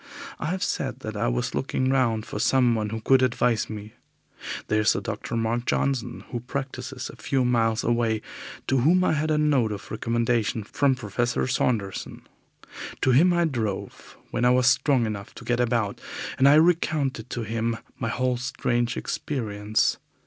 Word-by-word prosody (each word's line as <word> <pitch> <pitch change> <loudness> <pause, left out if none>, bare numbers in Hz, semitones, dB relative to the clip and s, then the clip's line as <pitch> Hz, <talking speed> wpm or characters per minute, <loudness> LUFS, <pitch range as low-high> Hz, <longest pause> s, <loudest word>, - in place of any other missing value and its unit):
I - - -3
have 185 +3 -1
said - - -2
that - - -5
I - - 0
was - - -1
looking 130 -1 0
round 115 -5 +1
for - - -5
someone 120 -3 +2
who 110 +1 -4
could 130 +3 +4
advise 125 -2 +1
me. 105 0 -7 0.7
There 110 0 +2
is 105 - +3
a - - 0
Dr. - - -4
Mark 115 +1 -1
Johnson 125 -3 -1
who 120 - -2
practices 130 +1 -5
some - - -7
few 135 -2 0
miles 115 -2 +2
away, 115 -2 +1 0.4
to 130 +1 +2
whom 175 +8 +4
I 185 - +2
had 155 +1 0
a 155 - +2
note 140 -7 +2
of 100 -1 -7
recommendation 115 -1 0
from 135 +5 +1
Professor 120 +1 -1
Saunderson. 110 -6 -1 0.8
To 130 - +3
him 160 +9 +5
I 175 -1 +3
drove, 110 -10 -4
when 120 - -1
I 125 - +5
was 125 0 +3
strong 130 0 +3
enough 100 -2 -5
to - - -11
get 120 0 0
about, 115 -4 0 0.4
and 135 +1 +7
I 145 - +7
recounted 155 -7 +2
to 120 - -3
him 115 +1 -1 0.2
my 115 - -1
whole 125 +1 0
strange 120 -1 -1
experience. 110 -6 -1
120 Hz, 170 wpm, -25 LUFS, 110-135 Hz, 0.8 s, and